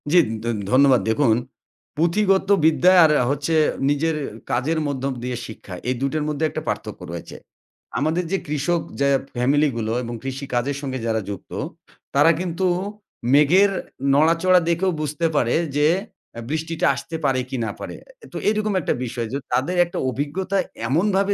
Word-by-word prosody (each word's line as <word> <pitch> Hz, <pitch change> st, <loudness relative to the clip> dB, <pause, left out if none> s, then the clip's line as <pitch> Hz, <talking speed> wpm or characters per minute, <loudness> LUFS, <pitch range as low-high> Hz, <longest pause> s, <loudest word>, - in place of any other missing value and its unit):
জি, 180 Hz, -, +5 dB, 0.3 s
ধ -, -, -7 dB, 0.3 s
ধন্যবাদ। 130 Hz, -1 st, +5 dB
দেখুন 115 Hz, -1 st, +3 dB, 0.6 s
পুঁথিগত 190 Hz, +4 st, +2 dB, 0.2 s
বিদ্যা, 175 Hz, +3 st, +5 dB
আর 155 Hz, -, +5 dB, 0.2 s
হচ্ছে 145 Hz, +3 st, -1 dB, 0.4 s
নিজের 155 Hz, +3 st, +1 dB, 0.4 s
কাজের 145 Hz, +7 st, 0 dB
মধ্যম 135 Hz, -1 st, -2 dB
দিয়ে 125 Hz, -1 st, -3 dB
শিক্ষা। 105 Hz, -3 st, -10 dB, 0.2 s
এই 130 Hz, -, +1 dB
২ 135 Hz, +1 st, 0 dB
টার 155 Hz, -1 st, -1 dB
মধ্যে 150 Hz, +1 st, -2 dB
একটা -, -, -4 dB
পার্থক্য -, -, -4 dB
রয়েছে। 85 Hz, -1 st, -7 dB, 0.6 s
আমাদের 160 Hz, +5 st, 0 dB
যে 195 Hz, -, +2 dB
কৃষক 150 Hz, +4 st, 0 dB, 0.2 s
যা 140 Hz, -, +3 dB, 0.3 s
ফ্যামিলিগুলো 125 Hz, -3 st, +1 dB
এবং 120 Hz, 0 st, -5 dB
কৃষিকাজের 135 Hz, 0 st, -2 dB
সঙ্গে 130 Hz, -2 st, -4 dB
যারা 110 Hz, -1 st, 0 dB
যুক্ত। 100 Hz, -3 st, -8 dB, 0.6 s
তারা 145 Hz, +4 st, +6 dB
কিন্তু 180 Hz, +1 st, -2 dB, 0.7 s
মেঘের 175 Hz, +8 st, +5 dB, 0.4 s
নড়াচড়া 165 Hz, +5 st, +4 dB
দেখেও 175 Hz, +3 st, +1 dB
বুঝতে 150 Hz, +2 st, -2 dB
পারে 120 Hz, -4 st, +2 dB, 0.2 s
যে 145 Hz, +1 st, +4 dB, 0.5 s
আ -, -, -6 dB
বৃষ্টিটা 160 Hz, +2 st, -2 dB
আসতে 165 Hz, -, -6 dB
পারে 135 Hz, -2 st, +2 dB
কি 135 Hz, -, -3 dB
না 105 Hz, -, -2 dB
পারে। -, -, -6 dB, 0.4 s
তো, -, -, -6 dB
এরকম 215 Hz, -1 st, 0 dB
একটা -, -, 0 dB
বিষয় 120 Hz, -1 st, -4 dB
যো -, -, 0 dB, 0.2 s
তাদের 135 Hz, +9 st, +1 dB
একটা 175 Hz, -, -7 dB
অভিজ্ঞতা 155 Hz, +9 st, -2 dB, 0.3 s
এমনভাবে 195 Hz, +6 st, +2 dB
145 Hz, 150 wpm, -22 LUFS, 130-170 Hz, 0.7 s, তারা